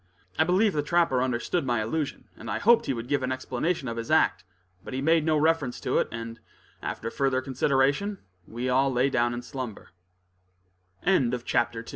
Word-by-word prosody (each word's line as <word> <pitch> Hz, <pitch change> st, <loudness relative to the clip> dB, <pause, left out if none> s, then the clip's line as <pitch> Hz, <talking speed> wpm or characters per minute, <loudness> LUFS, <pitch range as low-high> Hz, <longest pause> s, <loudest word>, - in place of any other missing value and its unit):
I -, -, +6 dB
believe 190 Hz, +4 st, +3 dB
the 150 Hz, -, +1 dB
trapper 165 Hz, -4 st, +2 dB
understood 130 Hz, +7 st, -1 dB
my 120 Hz, -2 st, 0 dB
allusion, 140 Hz, +7 st, -3 dB
and 115 Hz, -, -9 dB
I 100 Hz, -, -1 dB
hoped 235 Hz, -, +4 dB
he 135 Hz, -, +1 dB
would 115 Hz, +1 st, -6 dB
give 145 Hz, 0 st, +1 dB
an 130 Hz, 0 st, -2 dB
explanation 130 Hz, +4 st, -2 dB
of 115 Hz, -1 st, -4 dB
his 115 Hz, 0 st, -5 dB
act; 95 Hz, -, +3 dB, 0.4 s
but -, -, -6 dB
he -, -, -1 dB
made 160 Hz, +2 st, +3 dB
no 155 Hz, -1 st, +2 dB
reference 150 Hz, -5 st, +1 dB
to -, -, +1 dB
it, -, -, +1 dB
and, 115 Hz, 0 st, -6 dB, 0.4 s
after 115 Hz, -, -4 dB
further 135 Hz, -2 st, +1 dB
conversation, 140 Hz, +8 st, +1 dB, 0.3 s
we 120 Hz, +3 st, -4 dB
all 135 Hz, +2 st, +3 dB
lay 130 Hz, +2 st, +2 dB
down 120 Hz, -1 st, +2 dB
in 120 Hz, -, -4 dB
slumbe 125 Hz, -5 st, -6 dB
130 Hz, 175 wpm, -27 LUFS, 120-155 Hz, 0.4 s, I